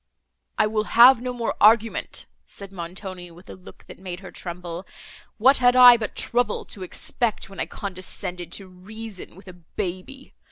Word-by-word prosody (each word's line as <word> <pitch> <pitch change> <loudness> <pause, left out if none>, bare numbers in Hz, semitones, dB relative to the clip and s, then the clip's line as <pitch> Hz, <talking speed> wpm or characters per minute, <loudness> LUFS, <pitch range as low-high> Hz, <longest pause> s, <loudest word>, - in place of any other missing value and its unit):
"I - - +3
will 215 0 -1
have 240 +2 +7
no 250 0 -3
more 240 -2 -3
argument," 225 +2 +3 0.2
said 200 -1 -10
Montoni, 180 0 -8
with 175 +2 -14
a - - -8
look 185 +1 -15
that - - -13
made 185 -1 -7
her 190 - -10
tremble. 175 0 -7 0.5
"What 260 +5 +5
had 245 0 +4
I 250 -1 +10
but 225 -2 -4
trouble 245 +1 -1
to 200 - -11
expect, 210 +4 -3
when 195 - -11
I - - -2
condescended 180 -2 -6
to 195 - -3
reason 200 +1 -10
with 190 +1 -16
a 185 - -10
baby! 185 +9 -7
195 Hz, 170 wpm, -23 LUFS, 180-230 Hz, 0.5 s, I